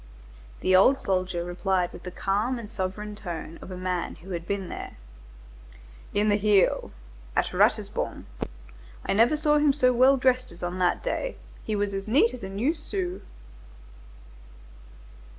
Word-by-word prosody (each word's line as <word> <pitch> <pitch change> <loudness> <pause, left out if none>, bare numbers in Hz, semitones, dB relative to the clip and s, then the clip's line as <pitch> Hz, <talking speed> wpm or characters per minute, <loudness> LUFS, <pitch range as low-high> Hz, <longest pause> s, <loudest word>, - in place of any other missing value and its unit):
The 185 - +4
old 255 +9 +6
soldier 185 -5 -1
replied 180 0 0
with - - -10
the 180 - -6
calm 205 +7 0
and 220 -3 -8
sovereign 205 +2 -4
tone 170 -4 -6
of - - -10
a 185 - -6
man 180 -1 -2
who 175 +4 -12
had 170 -1 -4
been 200 -2 -2
there:— - - -7 1.1
"In 205 +1 +1
the 205 -1 +4
heel. 205 -2 +3 0.5
At - - +1
Ratisbon. - - +1 0.8
I - - +1
never 235 +9 +4
saw 300 0 +3
him 295 -1 +4
so 255 -3 +3
well 260 +3 +5
dressed 255 -2 +2
as 170 +1 -11
on 175 +1 -3
that 180 -1 +1
day. - - -2 0.3
He 215 - -2
was 205 -1 -1
as 195 +1 -4
neat 305 - +4
as 245 - -8
a 190 - -4
new 225 +11 0
sou." 360 +3 -4
205 Hz, 160 wpm, -26 LUFS, 185-255 Hz, 1.1 s, old